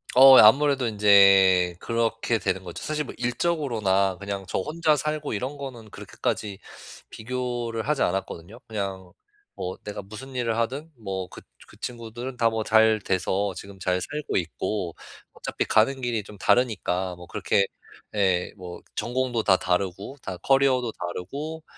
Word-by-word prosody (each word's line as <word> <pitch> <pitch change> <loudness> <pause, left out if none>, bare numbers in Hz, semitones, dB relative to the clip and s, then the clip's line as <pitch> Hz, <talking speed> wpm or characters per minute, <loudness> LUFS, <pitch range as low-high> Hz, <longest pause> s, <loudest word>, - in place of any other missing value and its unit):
어 130 +1 +10
예 - - +11
아무래도 135 +3 +5
인제 100 -4 +5
그렇게 115 0 0
되는 95 0 -1
거죠. 85 -2 -8
사실 155 0 -2
뭐 - - -8
일적으로나 120 - 0
그냥 100 -1 -4
저 - - -1
혼자 155 - +1
살고 150 +1 -2
이런 130 +7 -3
거는 120 -6 -8
그렇게까지 100 -2 -4 0.5
비교를 120 -1 -4
하지 150 -1 +1
않았거든요. 95 +3 -2
그냥 95 -4 -5 0.4
뭐 90 0 -5
내가 105 0 -6
무슨 110 +7 -10
일을 115 -2 -1
하든 135 +8 -2
뭐 95 -4 -4
그 - - -11 0.3
그 - - -17
친구들은 120 +1 -6
다 115 -2 +3
뭐 110 -1 -2
잘 110 0 +4
돼서 95 +1 -1
지금 100 0 -10
잘 90 -1 -1
살고 150 +7 -3
있고 90 +1 -3 0.4
어차피 - - -3
가는 130 +5 +2
길이 120 -4 -1
좀 105 - -12
다르니까 95 -7 +1
뭐 90 0 -12
그렇게 100 -1 +1 0.5
예, 95 -3 +1
뭐 90 -2 -9
전공도 125 -2 -1
다 95 -3 +5
다르고 95 +8 -2
다 95 -3 -5
커리어도 130 +2 +2
다르고 140 - -6
110 Hz, 310 characters per minute, -25 LUFS, 95-125 Hz, 0.5 s, 예